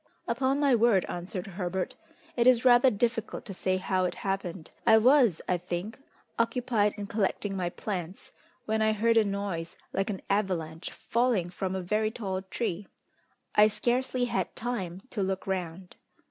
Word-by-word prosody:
"Upon 270 +1 +1
my 285 -2 +4
word," 230 -5 +4
answered 180 +1 -5
Herbert, 185 -1 -3 0.4
"it 240 0 +3
is 250 -1 +5
rather 245 +1 +7
difficult 225 0 -1
to 195 - -6
say 185 0 0
how 185 0 0
it 180 - -1
happened. 190 -4 -3
I 220 - +7
was, 240 - +4
I 180 -1 +1
think, 180 +7 -5 0.4
occupied 230 -3 +1
in 205 - -4
collecting 205 -1 -1
my 180 -2 -1
plants, 180 -1 -5 0.3
when 220 0 0
I 220 0 +3
heard 230 +2 +2
a 225 - +6
noise 200 -5 -3 0.2
like 195 +1 0
an 195 -3 -4
avalanche 180 -5 -1
falling 230 -7 0
from 190 +1 -3
a 190 - -3
very 215 +4 +1
tall 195 -5 -4
tree. 195 -1 -3 0.7
I 210 0 +7
scarcely 245 +3 0
had 190 -6 -2
time 195 -6 -3
to 210 - -2
look 190 0 -2
round. 185 -1 -4
200 Hz, 160 wpm, -29 LUFS, 185-230 Hz, 0.7 s, rather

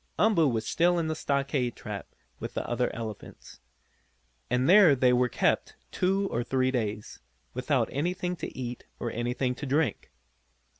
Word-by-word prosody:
Umboo 205 -8 +4
was 110 -3 -1
still 175 +7 +2
in 165 -2 0
the 155 - -1
stockade 140 -4 -1
trap - - -7 0.3
with - - -6
the - - -2
other - - 0
elephants. 110 -3 -8 0.9
And 125 +2 +1
there 185 -6 +7
they 125 -1 +4
were 125 0 +3
kept - - 0 0.2
two 195 +2 +1
or 120 - 0
three 130 +1 +1
days, 110 -4 -3 0.3
without 125 -1 +1
anything 180 +5 -1
to - - -7
eat 125 -1 -5
or 120 - -3
anything 125 +2 -1
to 145 +3 -6
drink. 145 +2 0
130 Hz, 155 wpm, -28 LUFS, 120-160 Hz, 0.9 s, there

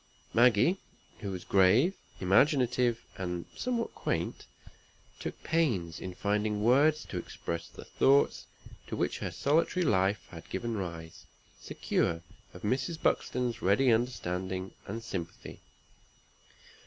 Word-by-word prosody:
Maggie, 120 - +5 0.4
who 100 - -4
was 95 -2 -5
grave, 105 - +4 0.3
imaginative, 125 +3 +3 0.2
and 90 -2 -3
somewhat 240 -2 -2
quaint, - - -3 0.7
took - - -6
pains 115 - 0
in 95 -1 -6
finding 105 +1 0
words 145 +6 +4
to - - -4
express 85 0 -5
the - - -12
thoughts 140 +1 +3 0.4
to - - -4
which - - -1
her - - -3
solitary 165 +5 +1
life 100 -2 +2
had 85 -2 -11
given 115 +4 -3
rise, 85 -4 -6 0.3
secure 85 0 -1 0.3
of - - -12
Mrs. 135 +9 -1
Buxton's 125 -2 0
ready 120 +7 +4
understanding 95 -6 -1 0.2
and 115 +3 -5
sympathy. 90 -7 -6
110 Hz, 115 wpm, -30 LUFS, 95-130 Hz, 0.7 s, Maggie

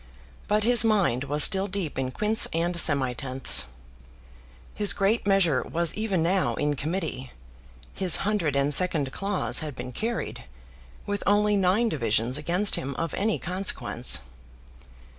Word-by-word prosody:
But 210 0 0
his 240 0 +5
mind 195 - 0
was 145 +2 +3
still 195 0 +2
deep 185 -8 -5
in 130 -1 -3
quints 210 +9 +2
and 170 +2 -1
semitenths. 135 -5 +2 1.1
His 205 -2 +5
great 205 +3 -1
measure 175 -10 +2
was 170 +3 -1
even 205 -6 -2
now 185 +2 0
in 145 0 -2
committee. 150 -3 -5 0.6
His 185 -3 +4
hundred 190 -9 -1
and 140 +1 +1
second 155 -5 +2
clause 195 +3 -2
had 150 -4 -6
been 125 0 -7
carried, 230 - -5 0.6
with 205 0 -4
only 210 +1 +2
nine 195 +4 +1
divisions 115 - -1
against 180 +7 0
him 135 +1 -5
of 165 +5 -4
any 210 +2 -1
consequence. 185 - 0
175 Hz, 140 wpm, -25 LUFS, 140-205 Hz, 1.1 s, his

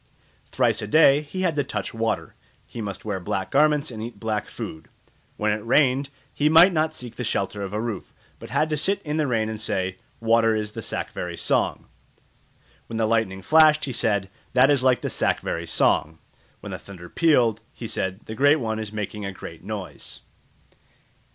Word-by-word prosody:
Thrice - - +1
a 105 - -4
day 145 +3 +5
he 185 +6 -5
had 170 -4 +1
to 145 - +2
touch 130 - -4
water; 115 -1 -2 0.3
he 115 - -8
must 100 -2 -6
wear 100 -3 -2
black 95 +1 -3
garments 150 0 +3
and 110 -2 -7
eat 115 -2 -7
black 110 -2 -2
food; 80 0 -7 0.5
when 105 0 +1
it 105 0 -2
rained, 135 +2 +3 0.2
he 150 +1 +2
might 170 +4 +7
not 155 -1 0
seek 125 -5 -7
the 125 - -3
shelter 100 -2 -2
of 100 -1 -4
a 105 - -2
roof, 110 -4 -4 0.3
but - - -10
had 155 - +1
to 150 - +1
sit 195 +7 +1
in 150 0 -2
the 155 -2 +1
rain 115 -4 0
and 110 0 -5
say, 95 -3 -1 0.2
"Water 115 -1 +3
is 105 -1 -2
the - - -6
Sakvari¯ 85 -1 -4
song"; - - 0 1.0
when 115 - -5
the 110 - +2
lightning 110 -4 0
flashed, 155 +4 +5
he 135 - -3
said, 100 -5 +1 0.2
"That 130 +3 +5
is 140 -3 +3
like 130 -1 +3
the - - -2
Sakvari¯ - - -1
song"; 80 +1 +2 0.4
when - - -7
the - - -5
thunder 90 -3 -11
pealed, 120 - +2
he 120 - -9
said, 95 -2 -2
"The 110 - -6
Great 145 +6 +5
One 110 -3 -2
is 110 -2 -5
making 105 0 -5
a 100 - -3
great 85 -3 -10
noise." 100 -1 -7
115 Hz, 195 wpm, -24 LUFS, 105-145 Hz, 1.0 s, might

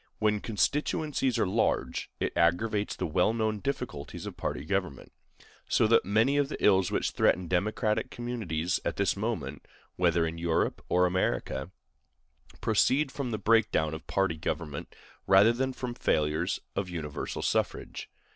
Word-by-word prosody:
When 105 -1 +1
constituencies 135 +4 0
are - - +2
large, 110 +4 0
it - - -1
aggravates 100 +5 +1
the - - -3
well 90 +7 +2
known 110 -2 0
difficulties 120 - -4
of - - -6
party - - -4
government; 90 -6 -2 0.6
so - - +3
that 115 +1 +4
many 110 +8 +3
of 140 -1 +2
the - - -4
ills 95 -3 +4
which - - 0
threaten 90 -1 +2
democratic 105 +4 0
communities 100 -8 -2
at - - -2
this 100 - +1
moment, 100 - -4 0.3
whether 85 -2 +3
in 80 +1 -4
Europe 85 -1 0
or 90 +1 +4
America, 90 -5 -1 0.9
proceed 135 +6 +2
from 140 -2 -4
the 110 - -2
break 110 +1 +3
down 80 0 +1
of 80 0 -8
party 95 -5 0
government 75 -2 -4 0.3
rather 100 +4 +6
than 130 +2 -1
from 125 -1 -5
failures 80 -2 0 0.2
of 95 -2 -2
universal 75 -4 -4
suffrage. - - -2
100 Hz, 150 wpm, -29 LUFS, 85-115 Hz, 0.9 s, rather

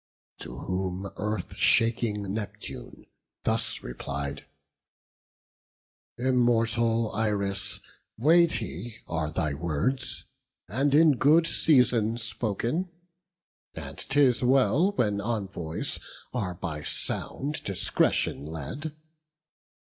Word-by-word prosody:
To - - -8
whom 95 +1 -3
Earth 105 0 -3
shaking 110 -4 +2
Neptune 105 -1 -6 0.4
thus - - 0
replied: 70 +3 -5 1.7
"Immortal 115 -2 +2
Iris, 100 -1 -1 0.4
weighty 120 - +2
are 80 -2 -2
thy 75 -1 -1
words, 85 - -2 0.4
And 135 +5 +2
in 155 -3 +6
good 155 +6 +5
season 125 -8 +3
spoken; 115 - -2 0.9
and - - -7
'tis 135 -3 +3
well 135 - +4
When 105 - +1
envoys 95 -7 -3 0.3
are 100 -8 -2
by 75 -3 -4
sound 145 - -4
discretion 95 -6 +1
led. 80 - -5
110 Hz, 85 wpm, -28 LUFS, 95-130 Hz, 1.7 s, in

